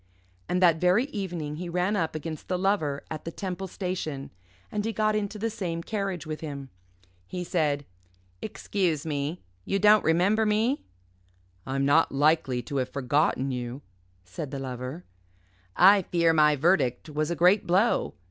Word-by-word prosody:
And 180 +1 +1
that 165 -3 +5
very 180 +8 +4
evening 170 -7 -4
he 175 +1 -5
ran 180 +4 0
up 165 -5 -1
against 155 0 -6
the 180 - 0
Lover 180 -7 0
at 155 -1 -5
the - - -4
Temple 190 +1 -5
Station, 175 -7 -4 0.4
and 210 -1 -1
he 225 - -1
got 215 0 +1
into 210 0 -2
the 225 +2 -2
same 170 -5 -4
carriage 195 -6 -3
with 155 0 -5
him. 140 -4 -7 0.6
He 180 -1 -4
said, 150 -5 0 0.6
"Excuse 175 -7 -2
me. 150 +2 -3 0.2
You 195 - 0
don't 210 +1 +6
remember 185 +7 +3
me?" 220 +6 +1 0.9
"I'm 135 +1 0
not 150 +4 +4
likely 140 -3 +2
to 140 - -4
have 130 -1 -1
forgotten 140 0 +1
you," 125 +2 -5 0.4
said 100 - -6
the 140 - -5
Lover. 130 +4 -5 0.7
"I 195 +2 +7
fear 170 -2 +2
my 150 -1 +5
verdict 145 -4 +1
was 155 0 -2
a 170 - -1
great 180 +5 +4
blow. 190 +7 +2
165 Hz, 160 wpm, -27 LUFS, 145-195 Hz, 0.9 s, I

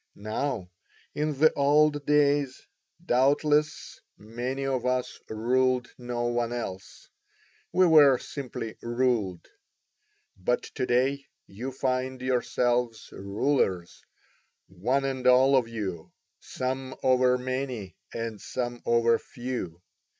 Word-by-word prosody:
Now 110 -2 -3 0.4
in 150 -1 -2
the 155 +3 +5
old 145 +1 +3
days, 145 -2 +2 0.4
doubtless, 150 +3 +1 0.2
many 120 +5 -4
of 130 -3 -1
us 125 0 -1
ruled 125 +3 +1
no 120 -1 -4
one 120 -1 0
else, 95 -6 -6 0.6
we 185 - +4
were 150 -6 +7
simply 120 -5 -6
ruled. 115 -7 -1 0.9
But 110 +7 -1
to 130 - -4
day 135 +3 +1 0.2
you 120 +7 -6
find 130 0 -2
yourselves 125 -2 0
rulers, 100 -3 -1 0.6
one 125 +10 -1
and 130 -2 -1
all 130 +2 +6
of 125 -3 +3
you, 100 -8 -5 0.3
some 130 +1 -4
over 125 -1 +4
many 125 -7 -4 0.2
and 115 -3 -5
some 120 -1 -4
over 115 0 +3
few. 120 -9 -6
125 Hz, 105 wpm, -27 LUFS, 115-135 Hz, 0.9 s, were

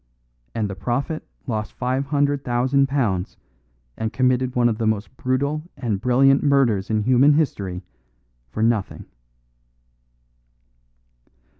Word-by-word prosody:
And 110 -2 0
the 100 - -5
prophet 135 +9 -3 0.2
lost 110 -5 -3
five 130 +2 -2
hundred 145 -1 +1
thousand 130 +3 +2
pounds 105 -10 -1 0.6
and 110 0 -3
committed 130 0 +1
one 120 -1 +4
of 110 -1 -1
the 115 - 0
most 110 +3 -2
brutal 140 +4 -1 0.2
and 110 -6 -2
brilliant 135 +2 +4
murders 130 -9 +2
in 110 -1 +1
human 130 +5 +5
history 100 - -1 0.7
for 110 - -2
nothing." 115 -3 0
125 Hz, 120 wpm, -22 LUFS, 110-135 Hz, 0.7 s, human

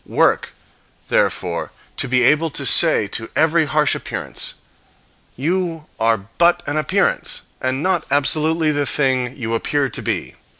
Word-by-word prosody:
Work, - - +1 0.6
therefore - - 0 0.3
to - - 0
be 125 0 +2
able 150 +5 +3
to 140 -1 -4
say 155 -11 +4
to 110 +2 -3
every 160 +1 +3
harsh 150 0 +1
appearance, - - -5 0.8
"You 165 +2 -2
are 115 -3 +1
but 175 0 +4
an 145 - -3
appearance, 155 -2 0 0.2
and 130 +3 -1
not 185 -4 +1
absolutely 155 +3 +2
the 145 -1 -1
thing 130 -3 0
you 115 -1 -3
appear 135 +4 0
to - - -5
be." - - -3
145 Hz, 140 wpm, -19 LUFS, 130-160 Hz, 0.8 s, say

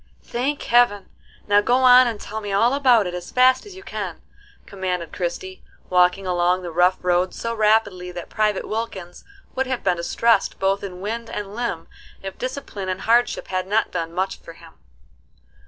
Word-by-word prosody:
"Thank 275 +4 -2
heaven! 235 -5 +3 0.4
Now 205 0 +5
go 240 +4 +2
on 255 -1 +7
and 225 -3 -3
tell 220 +1 -6
me 205 -1 -5
all 230 +6 +3
about 255 -6 +4
it 180 - -4
as 180 -1 -6
fast 255 +8 +3
as 395 - -11
you 380 - -11
can," - - -5 0.5
commanded 180 -4 -4
Christie, 185 +1 -5 0.3
walking 180 +2 +3
along 180 0 +1
the 175 - -5
rough 180 +3 +3
road 180 +1 +1
so 230 0 -3
rapidly 210 -4 +1
that 175 -1 -7
Private 210 -2 -1
Wilkins 205 -5 -5 0.3
would 265 0 -1
have 260 -2 -3
been 180 -2 +1
distressed 205 +5 +1
both 195 +1 0
in 185 -2 -7
wind 230 +3 -4
and 205 -1 -6
limb 215 -8 -4 0.4
if 195 0 -6
discipline 255 -7 -5
and 185 0 -3
hardship 235 +2 +1
had 185 0 -2
not 215 +2 +1
done 165 0 -3
much 190 +3 -2
for 165 - -12
him. 165 -1 -16
200 Hz, 180 wpm, -22 LUFS, 180-235 Hz, 0.5 s, on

